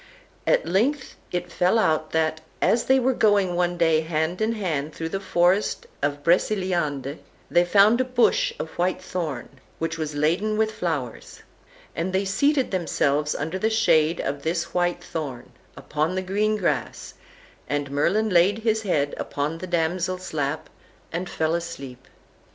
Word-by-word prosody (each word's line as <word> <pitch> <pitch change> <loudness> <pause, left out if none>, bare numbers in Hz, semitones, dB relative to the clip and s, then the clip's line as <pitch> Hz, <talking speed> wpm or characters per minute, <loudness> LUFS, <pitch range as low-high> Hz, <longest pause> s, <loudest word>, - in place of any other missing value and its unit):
At - - +3
length 245 - 0 0.2
it 175 0 -3
fell 180 +5 +2
out 155 -7 +1
that, 160 -1 0 0.2
as 235 - +2
they 265 0 +4
were 260 +1 +2
going 205 -6 +3
one 175 0 0
day 165 -2 +3
hand 160 +3 -2
in 220 +1 +1
hand 160 -8 -3
through 165 0 -4
the 195 - -2
forest 185 +1 +1 0.2
of 145 0 -1
Breceliande, 170 -6 0 0.3
they 175 +1 +5
found 205 +6 +5
a - - +3
bush 250 -1 +2
of 160 - -5
white 180 +1 +1
thorn, 155 -9 -4 0.3
which 165 0 -3
was 155 -2 -3
laden 175 +9 +1
with 220 0 +2
flowers; 155 - -4 0.5
and 180 +3 -2
they 190 +1 +1
seated 270 +8 +1
themselves 150 -5 0
under 160 +6 -3
the 220 - +1
shade 170 -7 +3
of 140 0 -3
this 170 +2 -2
white 175 0 0
thorn, 140 -7 -6 0.3
upon 155 +4 -2
the 185 - -1
green 210 +3 +1
grass, - - -2 0.6
and 145 -1 -2
Merlin 195 +10 +1
laid 180 +4 +4
his 220 -1 +2
head 150 -9 0
upon 150 +3 -3
the 185 - -6
damsel's 180 +2 -1
lap, 145 0 -2 0.4
and 175 +2 -3
fell 160 0 0
asleep. 140 -7 -6
175 Hz, 155 wpm, -24 LUFS, 155-195 Hz, 0.6 s, they